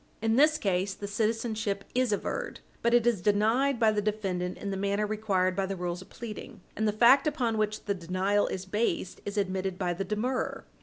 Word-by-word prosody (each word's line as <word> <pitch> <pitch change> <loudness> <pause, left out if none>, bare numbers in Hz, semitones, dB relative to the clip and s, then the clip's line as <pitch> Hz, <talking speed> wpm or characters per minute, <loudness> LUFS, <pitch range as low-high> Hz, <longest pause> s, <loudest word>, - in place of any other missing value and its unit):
In 225 +1 +1
this 305 +4 +5
case, 195 -2 0
the 205 - -6
citizenship 215 -1 -1
is 255 -2 +2
averred, - - -3 0.2
but 235 +1 +3
it 240 -1 +4
is 235 -6 +2
denied 225 +7 +2
by 220 -2 +5
the 210 -1 0
defendant 190 -4 -2
in 200 - -4
the - - -2
manner 200 +2 0
required 200 -4 0
by 195 0 0
the 195 - -3
rules 180 0 -3
of 190 - -14
pleading, 220 -4 -8
and 220 - 0
the - - +3
fact 245 +7 +5
upon 255 -7 0
which 215 0 -1
the 205 - +1
denial 185 +3 0
is 190 0 -4
based 190 -2 -1
is 205 +1 -4
admitted 190 -1 -1
by 180 -2 -1
the 185 +3 -3
demurrer. 220 +6 -2
210 Hz, 205 wpm, -29 LUFS, 190-225 Hz, 0.2 s, this